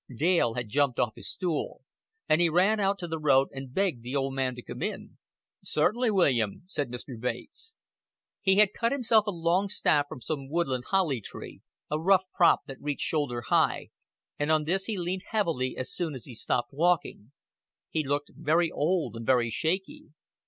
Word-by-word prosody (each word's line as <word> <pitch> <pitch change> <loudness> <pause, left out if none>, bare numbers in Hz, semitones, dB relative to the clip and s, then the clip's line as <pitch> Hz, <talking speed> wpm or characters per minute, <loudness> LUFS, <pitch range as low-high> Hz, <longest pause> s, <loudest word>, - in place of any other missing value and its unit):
Dale 155 -5 +2
had 120 -2 -3
jumped 140 +2 +1
off 110 -3 +1
his - - -5
stool; 175 -5 -3 0.4
and 155 +2 +3
he 170 - +4
ran 190 +6 +3
out 200 0 +1
to 175 -2 -5
the 160 -1 -3
road 135 -3 +4
and 135 -1 -8
begged 180 -6 0
the 125 +4 -5
old 135 -1 0
man 130 -2 -1
to 125 - -9
come - - -8
in. - - -5 0.4
"Certainly, 230 +11 +1
William," 130 - +1
said 145 -8 -3
Mr. 125 0 -7
Bates. 450 - -5 0.7
He 190 -1 +3
had 210 0 +5
cut 230 0 0
himself 230 -6 +3
a - - +1
long 175 +3 +1
staff 145 -7 +2
from - - -7
some 135 0 -4
woodland 135 -6 -1
holly 175 - +1
tree, - - -10 0.3
a 150 - 0
rough 190 +2 +4
prop 170 - +5
that 135 - -10
reached 145 -1 -2
shoulder 145 -7 -1
high, - - +2 0.5
and 145 +1 +1
on 155 -1 +3
this 185 +5 0
he 220 -3 -2
leaned 180 +2 -3
heavily 165 - -1
as 130 - -2
soon 165 -5 -2
as 125 - -8
he 130 - -9
stopped 120 +2 -1
walking. 150 -7 0 0.6
He 155 - 0
looked 145 +1 -2
very 165 +1 +1
old 155 - 0
and 115 - -6
very 120 -1 +2
shaky. 180 - -2
155 Hz, 190 wpm, -28 LUFS, 130-185 Hz, 0.7 s, had